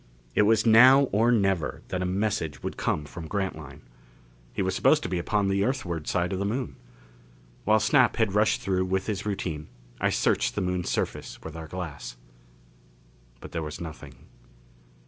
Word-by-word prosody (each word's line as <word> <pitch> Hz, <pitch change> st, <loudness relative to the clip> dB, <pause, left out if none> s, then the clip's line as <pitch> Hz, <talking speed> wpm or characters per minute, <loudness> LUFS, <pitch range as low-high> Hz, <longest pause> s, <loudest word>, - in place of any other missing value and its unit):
It -, -, +3 dB
was 110 Hz, 0 st, +3 dB
now 125 Hz, +5 st, +8 dB
or 115 Hz, +4 st, +3 dB
never 95 Hz, -, 0 dB
that 95 Hz, -, -2 dB
a 90 Hz, -, 0 dB
message 95 Hz, -6 st, -2 dB
would -, -, -4 dB
come 75 Hz, -, -1 dB
from 80 Hz, +2 st, -8 dB
Grantline. 80 Hz, -7 st, -4 dB, 0.7 s
He -, -, -2 dB
was -, -, -1 dB
supposed -, -, +3 dB
to -, -, -3 dB
be 90 Hz, -1 st, -1 dB
upon 100 Hz, +3 st, 0 dB
the 100 Hz, 0 st, +1 dB
Earthward 90 Hz, -, -2 dB
side 90 Hz, +1 st, 0 dB
of 95 Hz, -, -2 dB
the -, -, -1 dB
Moon. 120 Hz, +6 st, -3 dB, 0.9 s
While 110 Hz, 0 st, +4 dB
Snap 125 Hz, -1 st, +3 dB
had 110 Hz, -4 st, +1 dB
rushed 105 Hz, +2 st, +2 dB
through 95 Hz, -1 st, 0 dB
with 95 Hz, +1 st, -1 dB
his 105 Hz, -1 st, -3 dB
routine, 80 Hz, -6 st, -3 dB, 0.3 s
I -, -, +2 dB
searched -, -, +1 dB
the 105 Hz, -, -1 dB
Moon's 90 Hz, -1 st, -2 dB
surface -, -, -3 dB
with 80 Hz, 0 st, -8 dB
our 80 Hz, -1 st, -7 dB
glass. 80 Hz, -8 st, -7 dB, 1.2 s
But -, -, -10 dB
there 85 Hz, -, -3 dB
was 75 Hz, -1 st, -6 dB
nothing. 75 Hz, -6 st, -10 dB
95 Hz, 175 wpm, -26 LUFS, 80-105 Hz, 1.2 s, now